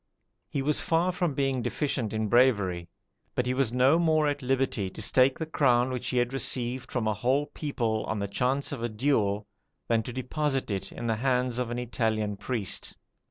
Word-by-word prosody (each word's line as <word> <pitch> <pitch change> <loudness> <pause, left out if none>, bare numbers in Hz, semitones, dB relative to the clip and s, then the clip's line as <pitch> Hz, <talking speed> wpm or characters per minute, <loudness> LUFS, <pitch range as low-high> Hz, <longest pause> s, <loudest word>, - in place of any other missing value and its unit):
He 135 - -2
was 150 +2 +1
far 170 +2 +1
from 175 -5 -1
being 135 -2 0
deficient 130 -5 -1
in 110 0 -1
bravery; 100 -8 +2 0.5
but 125 - +1
he 125 - 0
was 130 -3 +1
no 130 +6 +4
more 155 -2 +3
at 145 0 -1
liberty 130 -6 0
to - - -12
stake 130 +1 +3
the 160 - -3
crown 130 -5 +2
which 125 -1 -3
he 125 - -1
had 120 +1 +1
received 125 -2 -1
from 120 -4 -1
a 110 - +2
whole 130 +7 +1
people 120 -8 -2
on 110 - -2
the 100 0 -2
chance 125 +7 0
of 140 -5 -4
a 120 - -1
duel, 105 -3 +1 0.4
than 115 -1 +2
to 120 - -6
deposit 135 0 -2
it 95 -1 -3
in 120 - -6
the 115 -1 0
hands 125 0 +1
of 125 -2 -1
an 120 - -3
Italian 110 -3 -1
priest. 105 -1 -3
125 Hz, 200 wpm, -28 LUFS, 110-135 Hz, 0.5 s, no